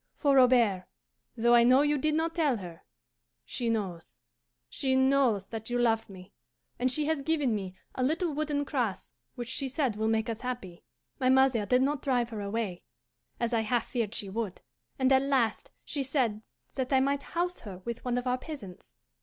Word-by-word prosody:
For, 285 Hz, -3 st, +2 dB
Robert, 235 Hz, -8 st, +4 dB, 0.5 s
though 235 Hz, +1 st, +4 dB
I 235 Hz, 0 st, +7 dB
know 255 Hz, +4 st, +6 dB
you 295 Hz, -1 st, +1 dB
did 305 Hz, +3 st, +1 dB
not 325 Hz, +1 st, 0 dB
tell 300 Hz, -8 st, +1 dB
her, 175 Hz, -4 st, -9 dB, 0.6 s
she 240 Hz, -2 st, -3 dB
knows 190 Hz, -, -3 dB, 0.5 s
she 260 Hz, -, -1 dB
knows 265 Hz, -6 st, +3 dB
that 225 Hz, 0 st, -6 dB
you 245 Hz, -, 0 dB
love 225 Hz, -3 st, +1 dB
me, 185 Hz, 0 st, -12 dB, 0.5 s
and 255 Hz, +1 st, +1 dB
she 300 Hz, +3 st, 0 dB
has 315 Hz, -2 st, 0 dB
given 295 Hz, -4 st, +1 dB
me 190 Hz, -3 st, -4 dB, 0.2 s
a -, -, -4 dB
little 320 Hz, +5 st, 0 dB
wooden 295 Hz, -1 st, -1 dB
cross 240 Hz, -, -2 dB, 0.2 s
which 240 Hz, -1 st, -5 dB
she 270 Hz, +1 st, -2 dB
said 265 Hz, -5 st, 0 dB
will 220 Hz, +1 st, 0 dB
make 220 Hz, 0 st, +1 dB
us 225 Hz, -1 st, -4 dB
happy. 240 Hz, -9 st, -6 dB, 0.4 s
"My 255 Hz, -1 st, +2 dB
mother 260 Hz, -5 st, +4 dB
did 250 Hz, +1 st, +4 dB
not 285 Hz, 0 st, 0 dB
drive 245 Hz, -3 st, +1 dB
her 215 Hz, -2 st, -4 dB
away, 200 Hz, -3 st, -3 dB, 0.6 s
as 235 Hz, 0 st, -1 dB
I 230 Hz, -, +3 dB
half 230 Hz, +1 st, 0 dB
feared 230 Hz, -4 st, -2 dB
she 200 Hz, -, -2 dB
would, 200 Hz, -1 st, -4 dB, 0.3 s
and 260 Hz, 0 st, +2 dB
at 265 Hz, -, +5 dB
last 265 Hz, -5 st, 0 dB, 0.2 s
she 290 Hz, -, -2 dB
said 255 Hz, -6 st, 0 dB, 0.3 s
that 260 Hz, -1 st, -3 dB
I 265 Hz, -, +5 dB
might 280 Hz, +1 st, +1 dB, 0.2 s
house 355 Hz, +1 st, 0 dB
her 200 Hz, -5 st, -8 dB
with 235 Hz, 0 st, -5 dB
one 245 Hz, -1 st, -1 dB
of 245 Hz, -, -2 dB
our 250 Hz, 0 st, 0 dB
peasants. 255 Hz, -, -10 dB
250 Hz, 195 wpm, -29 LUFS, 220-275 Hz, 0.6 s, I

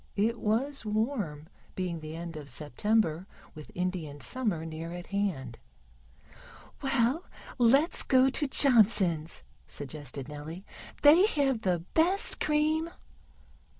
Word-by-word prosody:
It 225 Hz, +3 st, 0 dB
was 260 Hz, +6 st, -1 dB
warm, 210 Hz, -, -2 dB, 0.3 s
being 180 Hz, -3 st, -3 dB
the 155 Hz, 0 st, -8 dB
end 170 Hz, 0 st, -7 dB
of 150 Hz, -2 st, -8 dB
September, 165 Hz, -, 0 dB, 0.3 s
with 155 Hz, -2 st, -11 dB
Indian 180 Hz, -5 st, -3 dB
Summer 205 Hz, -, -2 dB
near 165 Hz, +1 st, -6 dB
at 175 Hz, 0 st, -7 dB
hand. 170 Hz, -, -3 dB, 1.2 s
"Well, 270 Hz, +4 st, +1 dB, 0.3 s
let's 270 Hz, +7 st, +4 dB
go 260 Hz, 0 st, +4 dB
to 285 Hz, +2 st, +1 dB
Johnson's," 205 Hz, -, +3 dB, 0.2 s
suggested 140 Hz, -2 st, -7 dB
Nellie. 155 Hz, +6 st, -8 dB, 0.4 s
"They 325 Hz, +8 st, +7 dB
have 275 Hz, -, 0 dB
the 175 Hz, -3 st, 0 dB
best 360 Hz, +5 st, +2 dB
cream." 310 Hz, +2 st, +1 dB
200 Hz, 115 wpm, -29 LUFS, 160-265 Hz, 1.2 s, They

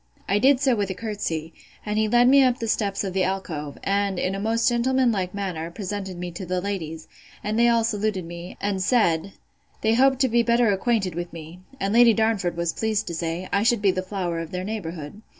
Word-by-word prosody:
I 200 Hz, +2 st, +2 dB
did 265 Hz, +2 st, +4 dB
so, 265 Hz, -3 st, +3 dB
with 205 Hz, -2 st, -1 dB
a 190 Hz, -, -3 dB
courtesy, 180 Hz, -7 st, -4 dB, 0.3 s
and 210 Hz, 0 st, -1 dB
he 220 Hz, -, +2 dB
led 240 Hz, +2 st, +4 dB
me 275 Hz, +2 st, +7 dB
up 255 Hz, -2 st, +3 dB
the 230 Hz, -, -4 dB
steps 205 Hz, -3 st, 0 dB
of 190 Hz, -2 st, -3 dB
the 190 Hz, -1 st, +1 dB
alcove, 170 Hz, -7 st, -3 dB
and, 200 Hz, -1 st, 0 dB
in 185 Hz, +1 st, -1 dB
a 195 Hz, -, -3 dB
most 225 Hz, +2 st, +1 dB
gentleman 250 Hz, +1 st, +2 dB
like 185 Hz, -3 st, -2 dB
manner, 180 Hz, -5 st, -3 dB
presented 190 Hz, 0 st, -5 dB
me 175 Hz, 0 st, -5 dB
to 175 Hz, +3 st, -7 dB
the 180 Hz, 0 st, -1 dB
ladies, 165 Hz, -5 st, -5 dB, 0.4 s
and 215 Hz, +2 st, -1 dB
they 235 Hz, 0 st, +5 dB
all 230 Hz, -1 st, +3 dB
saluted 210 Hz, -4 st, -1 dB
me, 170 Hz, +1 st, -9 dB
and 200 Hz, -2 st, -1 dB
said, 185 Hz, -4 st, +2 dB, 0.5 s
They 220 Hz, -, +2 dB
hoped 265 Hz, +3 st, +4 dB
to 265 Hz, -, +4 dB
be 235 Hz, 0 st, +3 dB
better 235 Hz, -1 st, +3 dB
acquainted 195 Hz, -2 st, 0 dB
with 175 Hz, +1 st, -5 dB
me: 165 Hz, +1 st, -10 dB, 0.2 s
and 200 Hz, -4 st, -1 dB
Lady 235 Hz, -1 st, +6 dB
Darnford 220 Hz, -6 st, +1 dB
was 170 Hz, -1 st, -1 dB
pleased 215 Hz, -1 st, -1 dB
to -, -, -4 dB
say, 170 Hz, +2 st, -3 dB
I 200 Hz, -, +3 dB
should 230 Hz, -1 st, +2 dB
be 195 Hz, -, +5 dB
the 185 Hz, -, -2 dB
flower 185 Hz, -3 st, -3 dB
of 165 Hz, -1 st, -5 dB
their 180 Hz, +1 st, -4 dB
neighbourhood. 180 Hz, -4 st, -6 dB
200 Hz, 225 wpm, -24 LUFS, 180-225 Hz, 0.5 s, me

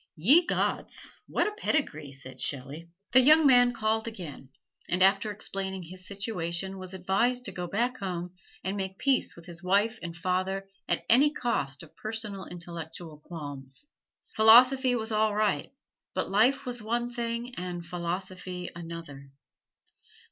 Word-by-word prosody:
"Ye 280 Hz, -, +5 dB
gods, -, -, -2 dB, 0.2 s
what -, -, +1 dB
a 425 Hz, -, 0 dB
pedigree!" 280 Hz, -, -1 dB
said 135 Hz, -1 st, -10 dB
Shelley. 145 Hz, +5 st, -3 dB, 0.2 s
The 260 Hz, -, +8 dB
young 305 Hz, +4 st, +7 dB
man 245 Hz, -2 st, +7 dB
called 220 Hz, -1 st, 0 dB
again, 165 Hz, -11 st, -8 dB, 0.4 s
and 180 Hz, +1 st, +3 dB
after 195 Hz, +2 st, +4 dB
explaining 195 Hz, -2 st, -4 dB
his 185 Hz, +2 st, -10 dB
situation 195 Hz, -2 st, -3 dB
was 185 Hz, 0 st, -6 dB
advised 235 Hz, +7 st, +1 dB
to 195 Hz, -, -3 dB
go 180 Hz, -1 st, -4 dB
back 240 Hz, +7 st, 0 dB
home 180 Hz, -3 st, -4 dB, 0.3 s
and 190 Hz, +1 st, -2 dB
make 190 Hz, -1 st, -4 dB
peace 270 Hz, +1 st, +2 dB
with 170 Hz, -, -13 dB
his 170 Hz, -1 st, -7 dB
wife 205 Hz, +5 st, +2 dB
and 170 Hz, -1 st, -6 dB
father 185 Hz, +2 st, -1 dB, 0.2 s
at -, -, 0 dB
any 270 Hz, +6 st, +6 dB
cost 145 Hz, -, -2 dB
of 160 Hz, -, -16 dB
personal 215 Hz, -3 st, -4 dB
intellectual 170 Hz, -2 st, -8 dB
qualms. 145 Hz, -, -7 dB, 0.5 s
Philosophy 250 Hz, +4 st, +7 dB
was 225 Hz, -1 st, -2 dB
all 215 Hz, -1 st, +2 dB
right; 215 Hz, 0 st, +1 dB, 0.4 s
but -, -, -1 dB
life 255 Hz, +8 st, +3 dB
was 245 Hz, -2 st, -3 dB
one 240 Hz, +2 st, -1 dB
thing 235 Hz, +1 st, -3 dB
and 175 Hz, -4 st, -5 dB
philosophy 180 Hz, +1 st, -4 dB
another. 165 Hz, -5 st, -8 dB
190 Hz, 150 wpm, -29 LUFS, 170-230 Hz, 0.5 s, The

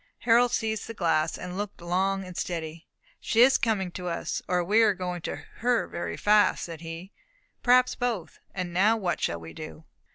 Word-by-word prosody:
Harold 240 Hz, +1 st, +4 dB
seized 220 Hz, -3 st, -1 dB
the 230 Hz, -, -7 dB
glass, 165 Hz, -4 st, +1 dB
and 180 Hz, 0 st, -7 dB
looked 205 Hz, -1 st, -5 dB
long 190 Hz, +3 st, 0 dB
and 180 Hz, -1 st, -10 dB
steadily. 165 Hz, -2 st, -4 dB, 0.3 s
"She 230 Hz, -, +2 dB
is 265 Hz, +2 st, +5 dB
coming 200 Hz, -6 st, 0 dB
to 180 Hz, 0 st, -6 dB
us, 170 Hz, -, -3 dB
or 180 Hz, -1 st, +1 dB
we 210 Hz, +6 st, +4 dB
are 210 Hz, -3 st, +4 dB
going 180 Hz, -1 st, -4 dB
to -, -, -4 dB, 0.2 s
her 240 Hz, 0 st, +1 dB
very 170 Hz, -, -5 dB
fast," 210 Hz, 0 st, +3 dB
said 165 Hz, -2 st, -8 dB
he. 165 Hz, +3 st, -8 dB, 0.5 s
"Perhaps 250 Hz, 0 st, +4 dB
both; 225 Hz, -10 st, -3 dB
and 180 Hz, -2 st, -4 dB
now 210 Hz, +6 st, +4 dB
what 180 Hz, -5 st, -2 dB
shall 85 Hz, -, -1 dB
we 80 Hz, 0 st, -10 dB
do?" 155 Hz, 0 st, -9 dB
185 Hz, 190 wpm, -27 LUFS, 170-220 Hz, 0.5 s, is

